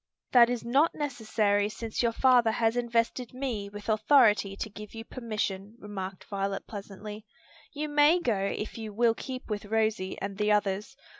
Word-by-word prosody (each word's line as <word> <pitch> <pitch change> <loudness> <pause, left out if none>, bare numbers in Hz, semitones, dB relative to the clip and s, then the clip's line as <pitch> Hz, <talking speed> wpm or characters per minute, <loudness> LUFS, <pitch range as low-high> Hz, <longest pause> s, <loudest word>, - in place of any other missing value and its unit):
"That 240 -2 +7
is 245 -2 -3
not 275 +7 +3
necessary 215 -7 0
since 220 +1 -4
your 235 -1 +2
father 245 -1 +4
has 225 0 +1
invested 235 +1 -1
me 240 -7 -3
with 205 0 -10
authority 215 -2 +4
to - - -3
give 210 +1 -10
you 225 0 -7
permission," 215 -4 -4
remarked 195 -4 -6
Violet 195 -1 -3
pleasantly. 210 +1 -8 0.5
"You 300 0 -3
may 295 +4 +5
go 240 -10 +1
if 205 +3 -3
you 220 -1 -5
will 235 0 +4
keep 255 +2 -7
with 210 -1 -4
Rosie 215 -2 0
and 200 0 -5
the 210 0 +2
others. 210 +5 0
220 Hz, 165 wpm, -29 LUFS, 205-245 Hz, 0.5 s, That